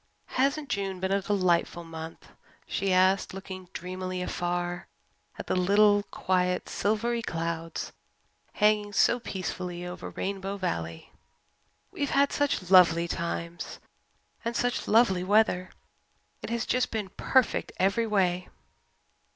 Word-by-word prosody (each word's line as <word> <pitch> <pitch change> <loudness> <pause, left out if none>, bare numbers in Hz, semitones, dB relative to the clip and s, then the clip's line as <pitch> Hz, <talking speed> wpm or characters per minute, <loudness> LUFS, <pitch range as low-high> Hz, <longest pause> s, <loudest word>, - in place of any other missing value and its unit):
"Hasn't 280 +3 +1
June 195 -2 -2
been 190 +1 -1
a 200 0 +2
delightful 180 -3 +1
month?" 160 0 -9 0.4
she 195 -1 -1
asked, 185 +1 +3
looking 185 -2 -8
dreamily 185 0 -4
afar 175 0 -2 0.5
at - - -6
the - - -1
little 205 +3 +4
quiet 180 -1 0
silvery 230 +3 0
clouds 165 -4 -3 0.6
hanging 210 -1 +2
so 240 +4 +4
peacefully 180 -4 -5
over 180 +1 -6
Rainbow 195 0 -4
Valley. 85 - -4 0.8
"We've 285 - -2
had 280 0 +3
such 265 -11 -1
lovely 170 -2 +6
times 170 0 -4 0.7
and 235 0 -2
such 245 0 0
lovely 205 -5 +4
weather. 195 -2 +3 0.7
It - - -6
has 235 0 -1
just 255 0 +1
been 210 -4 -3
perfect 260 +6 +1
every 200 +5 +2
way." 185 -4 +1
190 Hz, 120 wpm, -28 LUFS, 180-210 Hz, 0.8 s, lovely